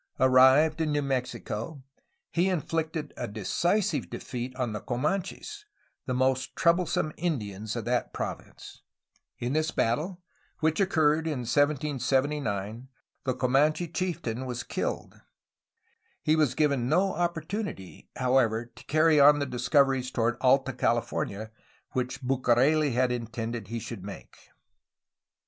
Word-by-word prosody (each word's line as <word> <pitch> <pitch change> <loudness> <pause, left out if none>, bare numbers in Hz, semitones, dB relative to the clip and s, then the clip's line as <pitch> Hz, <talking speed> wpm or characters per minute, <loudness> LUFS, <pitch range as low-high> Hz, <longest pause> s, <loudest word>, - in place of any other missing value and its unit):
Arrived 130 +5 +5
in 155 -1 0
New 145 0 +1
Mexico 130 0 -3 0.5
he 175 +3 +2
infficted 160 -3 -2
a 120 - -3
decisive 175 - 0
defeat 125 -1 -5
on 125 -4 -2
the 105 - -3
Comanches, 185 - -3 0.4
the 130 - 0
most 130 0 0
troublesome 170 -2 +2
Indians 110 - -3
of 115 -2 -4
that 125 0 0
province. - - -7 0.6
In 120 +2 -2
this 155 +1 +1
battle, 155 +10 -1 0.4
which 160 0 +1
occurred 160 -4 +2
in 145 -5 -2
1779, 130 -4 0 0.4
the 130 -2 0
Co 125 - 0
manche 155 +6 +2
chieftain 130 -9 -2
was 125 -1 -4
killed. - - -4 1.0
He 155 - +3
was 150 -5 +2
given 140 -5 +1
no 185 +5 +2
opportunity, 170 - -4
however, 125 -3 +2
to - - -14
carry 155 0 +4
on 145 +1 +8
the 145 - -1
discoveries 130 +1 +2
toward 120 -1 0
Alta 135 +1 +3
California 115 -3 -1 0.4
which 130 +1 -3
Bucareli 135 +3 +3
had 125 +1 +2
intended 115 -2 -4
he 115 +3 -4
should 115 -3 -7
make. 100 0 -9
130 Hz, 125 wpm, -28 LUFS, 120-155 Hz, 1.0 s, on